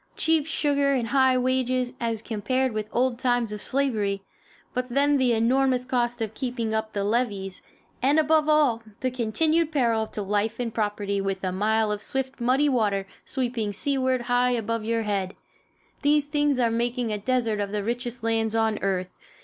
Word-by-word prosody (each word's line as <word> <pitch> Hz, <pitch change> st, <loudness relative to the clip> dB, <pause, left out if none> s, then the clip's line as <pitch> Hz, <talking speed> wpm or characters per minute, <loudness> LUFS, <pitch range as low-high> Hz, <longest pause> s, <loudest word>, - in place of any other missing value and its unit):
Cheap 320 Hz, -2 st, +2 dB
sugar 285 Hz, -3 st, +1 dB
and 240 Hz, -4 st, -1 dB
high 260 Hz, -2 st, +4 dB
wages, 255 Hz, 0 st, 0 dB
as 230 Hz, -2 st, -2 dB
compared 255 Hz, +4 st, -1 dB
with 215 Hz, -1 st, -4 dB
old 250 Hz, -1 st, 0 dB
times 245 Hz, -4 st, +1 dB
of 210 Hz, -, -5 dB
slavery 215 Hz, -8 st, 0 dB, 0.5 s
but 250 Hz, 0 st, -2 dB
then 285 Hz, +3 st, +3 dB
the 255 Hz, -3 st, +3 dB
enormous 250 Hz, +2 st, +2 dB
cost 240 Hz, -2 st, -1 dB
of 220 Hz, -1 st, -5 dB
keeping 240 Hz, -3 st, -3 dB
up 220 Hz, 0 st, -2 dB
the 200 Hz, -, -1 dB
levees, 205 Hz, -4 st, -1 dB, 0.4 s
and 275 Hz, +4 st, +3 dB
above 310 Hz, 0 st, +3 dB
all, 290 Hz, -7 st, +3 dB, 0.2 s
the 255 Hz, -1 st, 0 dB
continued 310 Hz, +7 st, +1 dB
peril 230 Hz, -6 st, +1 dB
to 210 Hz, -, -5 dB
life 210 Hz, +3 st, -1 dB
and 235 Hz, -2 st, -2 dB
property, 205 Hz, -2 st, -1 dB
with 195 Hz, -1 st, -3 dB
a 185 Hz, -, 0 dB
mile 215 Hz, +3 st, +1 dB
of 210 Hz, -1 st, -3 dB
swift, 265 Hz, +2 st, -3 dB
muddy 260 Hz, +5 st, +3 dB
water 210 Hz, -7 st, +1 dB, 0.2 s
sweeping 240 Hz, -5 st, -2 dB
seaward 260 Hz, +3 st, 0 dB
high 245 Hz, +1 st, +2 dB
above 230 Hz, -2 st, -1 dB
your 230 Hz, +1 st, 0 dB
head 200 Hz, -3 st, -2 dB, 0.7 s
these 295 Hz, 0 st, +3 dB
things 290 Hz, -2 st, +1 dB
are 235 Hz, -2 st, +2 dB
making 235 Hz, 0 st, -1 dB
a 210 Hz, -, -2 dB
desert 230 Hz, -1 st, 0 dB
of 200 Hz, -1 st, -2 dB
the 210 Hz, -1 st, -2 dB
richest 240 Hz, +1 st, -4 dB
lands 225 Hz, -1 st, 0 dB
on 220 Hz, -1 st, +1 dB
earth. 185 Hz, -2 st, -1 dB
240 Hz, 175 wpm, -25 LUFS, 215-260 Hz, 0.7 s, high